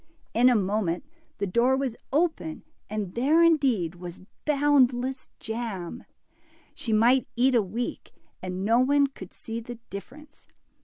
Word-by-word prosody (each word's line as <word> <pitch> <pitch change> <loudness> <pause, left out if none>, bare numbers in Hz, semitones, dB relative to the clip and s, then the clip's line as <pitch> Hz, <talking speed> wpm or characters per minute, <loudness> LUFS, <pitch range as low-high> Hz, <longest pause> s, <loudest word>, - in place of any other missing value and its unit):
In 245 +2 +5
a 250 - +4
moment 195 - 0 0.3
the 200 - -1
door 235 +7 +2
was 265 -4 -2 0.2
open, 300 - 0 0.3
and 205 -3 -3
there 295 +8 +4
indeed 265 - +3
was 175 0 -9 0.2
boundless 265 -3 +2
jam 220 -6 -5
I' - - -41 0.6
She 230 - -4
might 240 +4 +4
eat 255 +2 +3
a 235 - +5
week, 220 +5 -5 0.3
and 185 +1 -4
no 230 +3 +4
one 280 +2 +4
could 230 -10 -9
see 225 +1 -6
the 240 +1 -8 0.2
difference. 290 +10 -11
240 Hz, 145 wpm, -26 LUFS, 200-270 Hz, 0.6 s, In